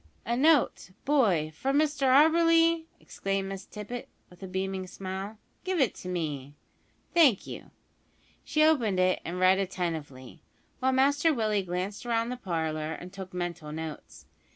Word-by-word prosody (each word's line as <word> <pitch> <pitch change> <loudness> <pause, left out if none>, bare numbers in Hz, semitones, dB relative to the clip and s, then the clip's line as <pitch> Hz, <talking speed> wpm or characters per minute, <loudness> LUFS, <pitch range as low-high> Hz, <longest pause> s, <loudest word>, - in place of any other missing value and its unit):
"A 235 - 0
note, 290 -3 +3 0.2
boy, 205 - +2
from 270 - 0
Mr 295 -2 +1
Auberly?" 330 +3 +5
exclaimed 195 0 -3
Miss 195 0 -7
Tippet, 215 +3 -7 0.2
with 180 - -18
a 190 - -6
beaming 190 0 -3
smile; 190 +3 -6 0.3
"give 370 -2 -1
it 260 -7 0
me 150 -6 -4 0.6
thank 295 - +5
you." - - -9 0.7
She 305 - +2
opened 240 -12 +3
it 185 0 +2
and 180 +2 -5
read 185 +1 +5
attentively, 165 -7 -4 0.4
while 260 +1 +2
Master 285 +4 +3
Willie 215 -6 +1
glanced 185 +3 -4
round 230 0 0
the 250 - -4
parlour 160 -6 -2
and 180 +3 -9
took 190 -1 -8
mental 175 -4 -4
notes. 160 0 -8
195 Hz, 145 wpm, -28 LUFS, 180-265 Hz, 0.7 s, Auberly